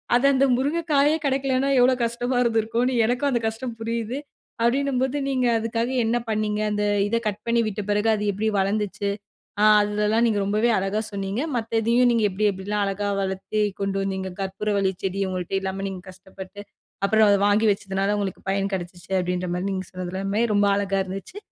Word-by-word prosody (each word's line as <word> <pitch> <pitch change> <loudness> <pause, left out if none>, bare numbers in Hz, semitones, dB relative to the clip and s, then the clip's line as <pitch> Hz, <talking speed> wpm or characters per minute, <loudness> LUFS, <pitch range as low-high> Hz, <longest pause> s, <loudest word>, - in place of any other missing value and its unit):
அத 245 - +2
அந்த 270 0 +4
முருங்கைக்காயே 295 +1 +2
கிடைக்கலனா, 270 0 +1
எவ்ளோ 250 +1 +5
கஷ்டமா 240 +2 -2
இருந்திருக்கும்னு 230 +2 +1
எனக்கும் 250 +5 +1
அந்த 240 - +1
கஷ்டம் 230 +1 -5
புரியுது. 230 +2 -3 0.4
அப்படின்னும்போது, 265 +2 +1
நீங்க 260 -2 +1
அதுக்காக 230 +1 -1
என்ன 225 +2 +1
பண்ணீங்க? 215 -1 -1
அந்த 210 0 0 0.2
இத 220 - -1
கட் 205 -1 -3
பண்ணி 235 0 +2
விட்ட 210 0 -3
பிறகு 210 +2 +2
அது 210 - -3
எப்படி 205 +3 -2
வளர்ந்துச்சு? 200 0 -1 0.5
அ - - +6 0.2
அதுதல்லாம் 210 +2 +1
நீங்க 215 -3 +1
ரொம்பவே 215 +4 +1
அழகா 195 +3 -1
சொன்னீங்க. 195 +3 -3 0.2
மத்த 225 -1 -1
இதையும் 240 +2 +4
நீங்க 230 -2 +2
எப்படி, 205 +3 0
எப்படிலாம் 200 +2 -3
அழகா 200 +1 -2
வளர்த்து 190 +2 -2 0.2
கொண்டு 195 0 -1
வந்தீங்க? 190 -1 -3
கற்பூரவள்ளி 195 0 -1
செடி 195 +1 -1
உங்கள்ட்ட 185 0 -4
இல்லாம 190 0 -3
நீங்க 190 -2 -7
கஷ்டப்பட்டு 190 +2 -11 0.4
அப்புறம் 220 +1 +4
அத 200 - +4
வாங்கி 215 +2 +3
வச்சதுனால, 195 +1 -1
உங்களுக்கு 195 -2 -4
பயன் 195 0 -1
கிடைச்சுச்சு 175 0 -7
அப்படின்ற 180 0 -2
மாரி 180 +2 -2
நீங்க 185 -1 -4
சொன்னது 180 -1 -5
எல்லாமே 195 +3 -1
ரொம்ப 205 0 +3
அழகா 195 -1 0
இருந்துச்சு. 195 - -7
210 Hz, 170 wpm, -24 LUFS, 195-235 Hz, 0.5 s, அ